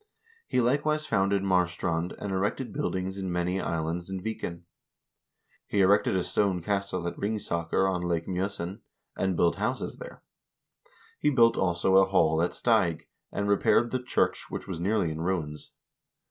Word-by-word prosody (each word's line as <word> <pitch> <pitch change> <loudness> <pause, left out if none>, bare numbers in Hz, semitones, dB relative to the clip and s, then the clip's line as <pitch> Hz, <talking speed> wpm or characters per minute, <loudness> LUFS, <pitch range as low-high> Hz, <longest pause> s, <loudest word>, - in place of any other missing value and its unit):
He - - +1
likewise 150 +5 +1
founded 100 -3 +1
Marstrand, 90 -2 0
and 100 - -5
erected 100 +7 -1
buildings 95 -9 -2
in 95 -1 -3
many 90 +2 0
islands 85 +2 -2
in 95 0 -3
Viken. 90 -4 -5 1.0
He 100 - +1
erected 95 0 +4
a 95 - +1
stone 100 -2 +1
castle 100 -3 -1
at 85 - -5
Ringsaker 95 -4 0
on 90 -2 0
Lake 85 -2 -1
Mj0sen, 95 +1 -3 0.4
and 95 -2 0
built 85 - +3
houses - - -2
there. - - -10 1.0
He 150 - +3
built, 115 -5 +5
also, 95 +1 +2
a 95 - +7
hall 80 -4 +3
at 85 - 0
Steig, 95 -9 +2 0.3
and 100 - -2
repaired 100 +3 +3
the 130 - -1
church, 125 - 0
which - - -6
was 90 -4 -4
nearly 95 -2 +1
in 80 +1 -5
ruins. 80 -4 -3
95 Hz, 155 wpm, -28 LUFS, 85-100 Hz, 1.0 s, a